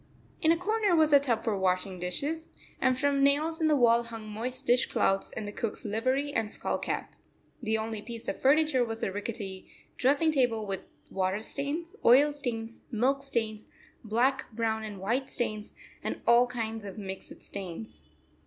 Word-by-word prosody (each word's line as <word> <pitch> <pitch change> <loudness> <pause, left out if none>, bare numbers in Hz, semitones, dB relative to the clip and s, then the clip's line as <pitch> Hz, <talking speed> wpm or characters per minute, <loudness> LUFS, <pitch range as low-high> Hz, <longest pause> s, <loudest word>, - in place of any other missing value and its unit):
In 320 -2 +5
a 335 - +4
corner 410 +1 +2
was 310 -2 +4
a 285 - +9
tub 250 -5 0
for 220 - 0
washing 185 0 0
dishes, 285 - -2 0.3
and 255 -1 +3
from 285 0 +2
nails 310 +4 +2
in 315 - +4
the 305 - +4
wall 235 -3 +5
hung 225 -2 -8
moist 250 +5 -5
dish 245 0 +4
clouts 195 0 +1
and 215 -2 -5
the - - -4
cook's 225 +1 -4
livery 255 +7 0
and 225 -4 0
skull - - -2
cap. - - -3 0.5
The 220 -2 +1
only 220 -1 -3
piece 230 +1 -8
of - - -3
furniture 285 -1 +4
was 225 -1 -4
a - - 0
rickety 205 -2 -5 0.3
dressing 285 +5 +3
table 245 -7 +1
with 195 -2 -4 0.2
water 190 +1 0
stains, 295 - -4
oil 280 +5 +6
stains, 230 -5 -4
milk 260 +4 +1
stains, 225 -5 -2 0.4
black, 240 +5 +1
brown, 220 -1 -1
and 210 -3 -6
white 240 +8 -1
stains, 215 -3 -3 0.3
and - - -3
all 240 +1 +6
kinds 225 -3 -4
of 200 0 -8
mixed 190 -2 -7
stains. 165 - -7
235 Hz, 175 wpm, -29 LUFS, 215-275 Hz, 0.5 s, a